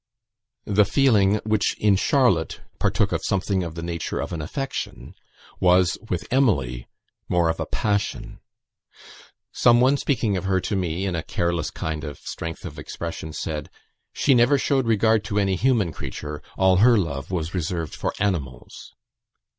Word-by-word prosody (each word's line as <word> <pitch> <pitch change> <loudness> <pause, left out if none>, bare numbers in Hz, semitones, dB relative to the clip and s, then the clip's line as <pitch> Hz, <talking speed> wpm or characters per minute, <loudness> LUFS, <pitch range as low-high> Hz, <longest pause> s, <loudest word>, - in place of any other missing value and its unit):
The 105 0 +4
feeling, 105 -4 +3
which 110 -2 +1
in 105 -2 +3
Charlotte 95 - +2 0.2
partook - - +1
of - - -2
something 95 0 0
of 80 -2 -6
the 85 - -5
nature 85 -1 -3
of - - -4
an 80 - -3
affection, 90 - -5 0.5
was, 90 0 +4
with 90 - -2
Emily, 70 - +1 0.4
more 85 -2 +2
of 80 - -2
a - - -3
passion. 105 -2 -2 1.1
Some 120 0 +4
one 130 +3 +4
speaking 115 -9 0
of 95 - -4
her 95 -1 +2
to 100 - -2
me, 90 0 -1
in 95 - -1
a 85 - -1
careless 85 0 -1
kind 80 -2 -4
of 75 -1 -6
strength 80 -1 -7
of - - -7
expression, 85 -1 -6
said, 75 -1 -4 0.4
"she 140 - +2
never 125 +3 +5
showed 135 -2 +1
regard 110 -1 +3
to 105 -1 -2
any 100 -2 +2
human 110 -4 +2
creature; 75 +2 -6 0.2
all 95 -1 +4
her 115 +4 +6
love 70 -8 -2
was 85 -2 -3
reserved 85 -3 -3
for - - -2
animals." 75 -12 -4
95 Hz, 160 wpm, -23 LUFS, 80-110 Hz, 1.1 s, her